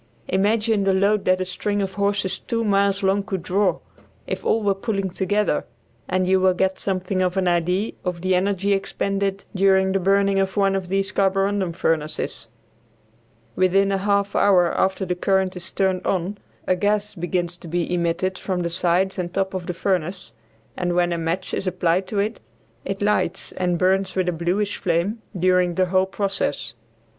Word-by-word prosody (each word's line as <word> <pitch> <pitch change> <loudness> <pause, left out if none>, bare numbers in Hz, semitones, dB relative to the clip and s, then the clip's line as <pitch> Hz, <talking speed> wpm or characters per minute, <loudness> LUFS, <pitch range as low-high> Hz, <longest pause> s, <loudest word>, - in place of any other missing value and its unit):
Imagine 210 +2 +2
the 195 -1 +2
load 200 +2 +2
that 185 0 +3
a - - 0
string 205 +3 -2
of 195 -1 -2
horses 200 -1 0
two 230 0 -2
miles 200 -1 +2
long 195 +1 +2
could 195 -4 -4
draw, 190 +1 +1 0.5
if - - -4
all 225 - +1
were 200 -1 +3
pulling 195 -2 -2
together, 200 -2 0 0.5
and 185 0 +1
you 190 0 +4
will 185 -1 +3
get 190 +1 0
something 185 -1 -1
of 180 +1 0
an 185 -1 +1
idea 180 +4 +1
of 180 -2 -3
the 185 +1 +1
energy 195 +2 +1
expended 195 0 -2
during 190 0 +3
the 195 - +1
burning 195 +1 +2
of 195 +1 -1
one 195 -1 +3
of 190 -2 -3
these 195 +1 0
carborundum 195 -1 +1
furnaces. 160 -2 -2 1.1
Within 195 +2 +3
a 195 - 0
half 200 0 0
hour 180 -4 +4
after 190 0 +1
the 180 - -1
current 190 +1 +1
is 180 +1 -8
turned 190 -1 0
on 195 +2 -1 0.3
a 185 - +2
gas 205 +2 0
begins 175 -1 -2
to - - -10
be 175 +1 -1
emitted 175 +2 -1
from 185 -2 -2
the 170 - -2
sides 185 +2 +1
and 175 -1 -3
top 190 +1 -1
of 185 -2 -4
the 180 - -2
furnace, 185 0 -2 0.4
and 175 -1 -1
when 175 -1 +2
a - - -1
match 165 +3 -2
is 190 - -2
applied 180 0 +1
to 205 - -4
it, 210 +3 -1 0.5
it 195 +1 -3
lights 205 -3 0
and 180 -1 -1
burns 190 +2 +1
with 185 -1 0
a - - +2
bluish 180 +5 -1
flame 185 +5 -1 0.2
during 180 -1 +3
the 185 - +3
whole 185 +1 +2
process. 190 - -2
190 Hz, 185 wpm, -22 LUFS, 180-200 Hz, 1.1 s, you